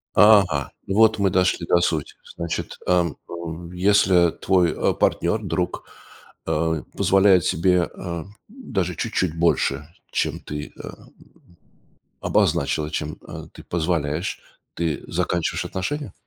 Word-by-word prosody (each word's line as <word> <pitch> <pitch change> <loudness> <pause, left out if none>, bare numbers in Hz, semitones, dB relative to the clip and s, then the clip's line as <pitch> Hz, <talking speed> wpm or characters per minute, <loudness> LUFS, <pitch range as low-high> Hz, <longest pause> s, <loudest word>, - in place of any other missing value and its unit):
Ага, 95 -9 +5 0.2
вот 110 +2 +4
мы 100 -1 +3
дошли 90 -2 +1
до 85 - +4
сути, 80 -4 -1 0.2
значит, 85 0 -4
эм, 85 -5 +2
ув 85 0 -7
если 90 -2 +4
твой, 90 -3 +2
а, - - +1
партнер, - - +1
друг, - - -2 0.6
а, 80 0 0 0.2
позволяет 95 -3 +4
себе, 90 +1 +2
а, 85 -1 -6 0.2
даже 95 - -3
чуть-чуть 85 +1 -1
больше, 75 -3 +1 0.2
чем - - -1
ты, 75 0 -7
а, - - -8 1.3
обозначила, 75 0 +1
чем, 75 -1 -4
э, - - -8
ты - - -12
позволяешь, 80 -1 -1 0.3
ты 80 -4 -2
заканчиваешь 85 -2 -1
отношения? 110 +6 -4
85 Hz, 120 wpm, -23 LUFS, 80-95 Hz, 1.3 s, Ага